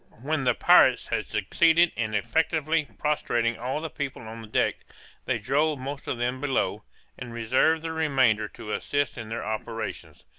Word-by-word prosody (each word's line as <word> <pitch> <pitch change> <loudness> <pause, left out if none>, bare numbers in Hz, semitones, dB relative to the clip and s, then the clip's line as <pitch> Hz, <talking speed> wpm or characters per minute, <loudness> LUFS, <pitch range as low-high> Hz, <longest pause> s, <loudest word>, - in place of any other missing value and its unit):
_] - - -22
When 150 -1 -1
the 125 -2 +3
pirates - - +5
had - - -1
succeeded 170 +1 +3
in 110 -2 -2
effectually 155 +5 +1
prostrating 120 -6 0
all 130 +5 -2
the 160 - -4
people 135 -3 -5
on 110 0 -9
deck, - - +1 0.5
they - - 0
drove 145 +6 +1
most 140 +2 -6
of - - -2
them 125 +2 -2
below, 140 -3 -1 0.4
and 120 -1 -7
reserved 130 +8 +2
the 165 - -3
remainder 135 -9 +2
to 105 - -9
assist 145 +4 -1
in 110 -2 -7
their 115 - -4
operations. 110 +1 -5
130 Hz, 170 wpm, -26 LUFS, 115-155 Hz, 0.5 s, pirates